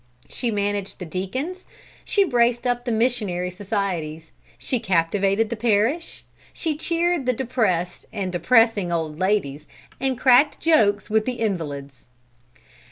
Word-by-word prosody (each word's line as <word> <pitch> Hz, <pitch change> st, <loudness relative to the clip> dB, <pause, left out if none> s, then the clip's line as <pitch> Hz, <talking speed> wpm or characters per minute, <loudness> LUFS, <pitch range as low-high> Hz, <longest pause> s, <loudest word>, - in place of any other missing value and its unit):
She 245 Hz, -, -3 dB
managed 205 Hz, -2 st, -2 dB
the 180 Hz, -, -7 dB
deacons, 255 Hz, -, -4 dB, 0.4 s
she 400 Hz, -, +2 dB
braced 240 Hz, -6 st, +2 dB
up 245 Hz, 0 st, 0 dB
the 245 Hz, -, -1 dB
missionary 215 Hz, -6 st, 0 dB
societies, 180 Hz, -6 st, -3 dB, 0.3 s
she 250 Hz, -, -2 dB
captivated 195 Hz, +4 st, +1 dB
the -, -, -1 dB
parish, 230 Hz, +8 st, 0 dB, 0.3 s
she 320 Hz, -3 st, -2 dB
cheered 335 Hz, -2 st, 0 dB
the 255 Hz, -, +3 dB
depressed 220 Hz, -9 st, -1 dB
and 190 Hz, -3 st, -3 dB
depressing 215 Hz, 0 st, +3 dB
old 160 Hz, -2 st, -2 dB
ladies 180 Hz, -7 st, 0 dB, 0.3 s
and 265 Hz, -1 st, -1 dB
cracked 260 Hz, +3 st, +4 dB
jokes 210 Hz, -11 st, +2 dB
with 220 Hz, 0 st, +2 dB
the 255 Hz, -, -1 dB
invalids. 145 Hz, -, -4 dB
215 Hz, 130 wpm, -23 LUFS, 180-250 Hz, 0.4 s, cracked